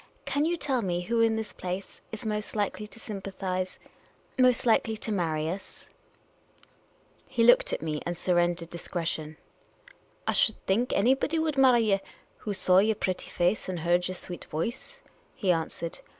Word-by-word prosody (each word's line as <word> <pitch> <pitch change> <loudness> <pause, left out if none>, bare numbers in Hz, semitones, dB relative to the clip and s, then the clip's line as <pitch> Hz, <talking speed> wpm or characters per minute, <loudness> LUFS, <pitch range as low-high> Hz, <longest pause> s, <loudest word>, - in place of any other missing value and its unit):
Can 285 +2 +1
you 340 +1 +1
tell 270 -5 0
me 175 -3 -1
who 230 +5 +1
in 225 -1 +4
this 220 -1 -4
place 185 +2 -6
is 220 0 -7
most 210 0 -2
likely 210 0 -1
to 225 - -14
sympathise 190 -3 -4 0.3
— - - -24
most 255 -1 +4
likely 225 -1 +3
to 215 - -3
marry 160 -5 0
us? 185 +4 -7 0.7
" - - -33
He 235 -3 +1
looked 240 +1 +6
at - - -2
me 155 -2 -2
— - - -28
and 175 0 -3
surrendered 175 -1 +1
at - - -33
discretion. 165 -3 -4 0.4
" - - -26
I - - +3
should 220 - +3
think 230 +6 +1
anybody 270 +8 +2
would 315 -2 0
marry 260 -3 +6
ye 205 -3 +3 0.4
who 210 - -5
saw 185 -1 +4
yer 215 +2 +3
pretty 185 -3 -2
face 180 +3 0
and 180 -3 -3
heard 175 +2 +2
yer 185 - -4
sweet 175 -1 -6
voice," 230 +12 -4 0.3
he 190 -4 +2
answered. 165 0 -3
195 Hz, 180 wpm, -28 LUFS, 175-230 Hz, 0.7 s, looked